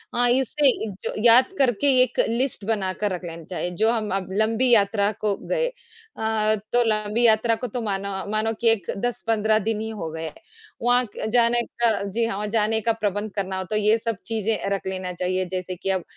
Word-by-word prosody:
हाँ, 245 0 +3
इससे 265 +3 +2 0.2
इ 220 - -3
जो - - -2
याद 245 +8 +6
करके 260 0 +2 0.2
एक - - -3
लिस्ट 235 -3 -1
बनाकर 205 -1 -1
रख 180 0 -5
लेना 165 -1 -7
चाहिए, 180 -1 -3
जो 220 +6 +2
हम 220 -3 -1
अब 190 -2 -3
लंबी 225 +4 +2
यात्रा 205 -2 +3
को 205 -2 +1
गए। - - +1
अ, 220 - -2 0.2
तो 245 - +5
लंबी 215 +2 +1
यात्रा 225 +1 +4
को 250 +2 -5
तो 240 +2 -4
मानो 200 -2 -2 0.2
मानो 220 +1 0
कि 230 - +4
एक 215 -6 +1
10-15 220 -1 +1
दिन 220 -1 0
ही 220 - -4
हो 200 -7 -5
गए 160 0 -6
हैं। - - -6 0.5
वहाँ 245 +1 +3
क - - -4
जाने 240 0 +4 0.2
का 225 -2 +3
जी 220 +4 -1
हाँ, 230 -3 -2
वहाँ 210 0 -3
जाने 220 +1 +1
का 230 +1 +1
प्रबंध 205 -1 -2
करना 190 -1 -2
हो, 190 - -2
तो 200 +4 -4
ये 215 +1 +3
सब 225 -2 -3
चीज़ें 225 -1 -1
रख 195 -1 -2
लेना 185 -1 -4
चाहिए। 185 +1 -1
जैसे 185 0 -3
कि 190 +2 -5
अब 190 -3 0
215 Hz, 210 wpm, -24 LUFS, 200-235 Hz, 0.5 s, याद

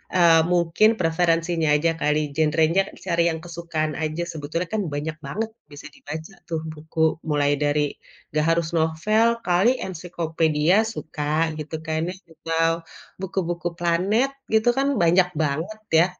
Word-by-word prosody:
eee, 170 -2 +6
mungkin 175 +4 +4
preferensinya 165 -1 +1
aja 165 +3 +2
kali, 150 -1 +1
genrenya 160 +4 +2 0.2
cari 170 -2 +2
yang 160 - -4
kesukaan 165 -3 -3
aja, 155 +2 -2
sebetulnya 160 +3 -3
kan 215 - +1
banyak 155 +2 -3
banget 220 +10 -3 0.2
bisa 145 +1 -10
dibaca 160 +5 -8
tuh 165 -2 -2
buku 160 +1 -1
mulai 145 -1 +2
dari, 145 0 0 0.3
nggak 155 +1 +1
harus 165 -1 +2
novel, 165 +8 +2 0.2
kali 185 +8 +3
ensiklopedia 165 -2 0
suka 155 -5 -2
gitu, 155 +1 -5
kayaknya 160 +3 -2 0.2
atau 165 +1 0 0.5
buku-buku 175 -2 -2
planet 190 +10 +2 0.2
gitu 220 +2 +4
kan 275 +1 +2
banyak 175 +2 +4
banget 160 +9 -2 0.2
ya. 175 - +5
165 Hz, 135 wpm, -23 LUFS, 155-175 Hz, 0.5 s, eee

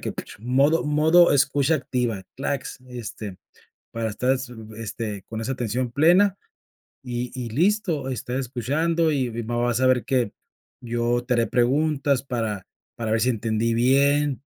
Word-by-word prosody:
que - - -4 0.3
modo 135 +8 +2
modo 155 +4 +5
escucha 140 +2 +3
activa, 125 -8 -2
clacks, 135 -1 -3
este, 110 -5 -7 0.6
para 115 -1 -2
estar 125 +5 +1
s 130 -1 -3
mm, 110 -1 -11
este 110 -2 -5
con 110 -1 -5
esa 130 - -2
atención 125 0 -2
plena. 180 +7 +4 0.7
Y 125 0 -4
y 120 -2 -4
listo, 170 - +1
estás 125 0 -3
escuchando, 155 +6 0
y 130 -4 0
va 120 +2 -3
vas 120 0 +1
a - - +4
ver 125 -2 +2
que 125 -5 +1 0.5
yo 120 0 0
te 125 -1 +1
haré 115 - +2
preguntas 140 +1 +1
para 110 -7 -3 0.3
para 115 -2 -4
ver 110 - +2
si 125 - +3
entendí 115 0 0
bien, 140 +3 +2
125 Hz, 150 wpm, -24 LUFS, 115-140 Hz, 0.7 s, modo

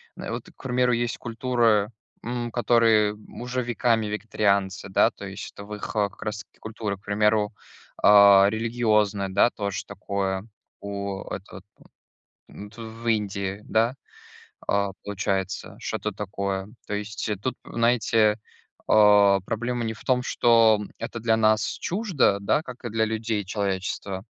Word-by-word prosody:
на - - -6
вот - - -5
к - - -17
примеру, 125 -1 +1
есть 120 0 -1
культуры, 115 -3 +1 0.3
м, 120 0 -3
которые, 115 -3 +3
м, 105 +2 -12
уже 125 +1 -2
веками 115 -2 +1
вегетарианцы, 100 -2 0
да. 95 - +4
То 100 - -10
есть 95 +1 -7
это 100 - -10
в 105 - -8
их, 105 - -7
э, 105 -1 +2
как - - -20
раз 105 0 -3
таки - - -33
культуры, 110 -2 -4
к - - -27
примеру, 105 +1 +1 0.5
а, 100 -1 +8
религиозная, 110 -3 +1
да, 100 +5 +4
тоже 100 -2 -4
такое. 95 0 -3 0.3
У 100 -1 -4
это - - -7
вот - - -10 0.9
в - - -18
м, 100 - -9
это 110 +2 -11
в 115 +1 -9
Индии 100 -2 -1
да, 115 +3 +1 0.7
а, 100 0 +1
получается, 100 -1 -3
что-то 105 - -3
такое. 100 -1 -3 0.2
То 105 - -3
есть, 105 +1 -4
э, 105 - -1
тут, 115 +7 -3
знаете, 115 -2 +2 0.5
а, 105 -2 +6
проблема 120 +4 -3
не 110 - -2
в 110 - -14
том, 125 -1 +2
что 115 -3 +4 0.2
это 115 0 -5
для 110 0 +2
нас 110 -1 +3 0.2
чуждо, 180 - +1
да, 100 +9 +1
как 125 -3 -11
и - - -2
для 110 +1 +1
людей, 110 -1 -2
человечества. 95 -1 -3
105 Hz, 155 wpm, -25 LUFS, 100-115 Hz, 0.9 s, а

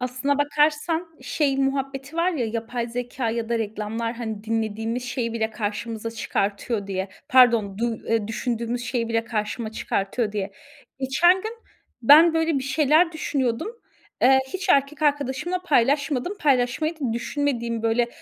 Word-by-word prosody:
Aslına 255 +3 -1
bakarsan 300 +3 +1
şey 280 -3 0
muhabbeti 270 +2 -2
var 340 +2 +2
ya 275 -10 -1
yapay 230 +2 -3
zekâ 245 0 -3
ya 230 0 -3
da 235 0 0
reklamlar 220 +1 -3
hani 220 -3 -5
dinlediğimiz 225 +2 -2
şeyi 235 -2 -2
bile 225 -1 -1
karşımıza 220 +1 -4
çıkartıyor 205 -1 -2
diye. 190 0 -3 0.2
Pardon, 235 -6 +5
duy 230 -1 -1
eee, 225 -2 +1
düşündüğümüz 235 +1 -2
şeyi 240 -3 -1
bile 230 0 0
karşıma 220 0 -3
çıkartıyor 205 +1 -2
diye. 200 -1 -3 0.5
Geçen 270 +7 +4
gün 440 - -4 0.5
ben 315 +7 +8
böyle 325 -2 +2
bir - - -4
şeyler 310 +4 +3
düşünüyordum. 275 - -1 0.5
Eee, 265 +2 +7
hiç 380 +1 -4
erkek 280 -1 +2
arkadaşımla 290 +5 0
paylaşmadım. 285 +1 +1
Paylaşmayı 270 +3 +1
da 250 -5 -1
düşünmediğim 235 -2 -2
böyle 230 +1 +2
245 Hz, 140 wpm, -24 LUFS, 225-285 Hz, 0.5 s, ben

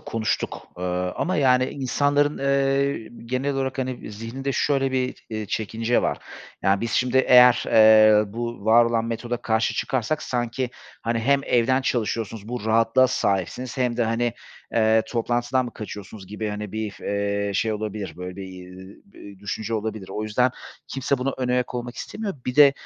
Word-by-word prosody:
konuştuk, 110 -1 -3
eee, 90 - -4 0.3
ama 185 +2 0
yani, 130 -3 +4
insanların, 145 +3 0
eee, 140 -2 +1 0.2
genel 130 +3 -1
olarak, 135 0 -2
hani, 130 -4 -4
zihninde 120 +6 -4
şöyle 135 -1 +1
bir, 130 -1 -2
eee, 110 -1 -4
çekince 110 +4 0
var. - - -1 0.4
Ya 95 +1 +2
biz 115 - -2
şimdi 125 +1 +2
eğer, 125 -1 +7
eee, 110 -1 +6
bu 120 -2 -5
var 115 +2 +6
olan 115 -1 0
metoda 120 +1 -3
karşı 110 -1 0
çıkarsak 130 +4 -1
sanki, 120 +1 -2 0.3
hani, 115 0 0
hem 140 +4 +2
evden 125 +2 +2
çalışıyorsunuz, 115 -3 -2
bu 120 -3 -4
rahatlığa 115 +3 +4
sahipsiniz 105 +3 -1
hem 125 -2 0
de, 120 - +2
hani, 115 +1 0 0.4
eee, 110 0 +4
toplantıdan 120 +2 0
mı 120 - -7
kaçıyorsunuz 105 -2 -8
gibi, 105 +2 -4
hani, 105 -1 -5
bir, 110 -2 -4
eee, 100 0 -1
şey 110 +2 +1
olabilir, 105 -4 -4
böyle 90 +1 -7
bir, 100 - -6
eee, 95 +1 -11
bir 100 - -13
düşünce 105 +3 -4
olabilir. 110 -2 -4
O 105 - -3
yüzden 115 +4 +2 0.4
kimse 135 0 -1
buna 135 +2 -1
önayak 125 -1 0
olmak 120 0 -5
istemiyor. 210 -2 -5
Bir 125 +1 -3
de, 145 -2 +8
115 Hz, 165 wpm, -24 LUFS, 110-130 Hz, 0.4 s, de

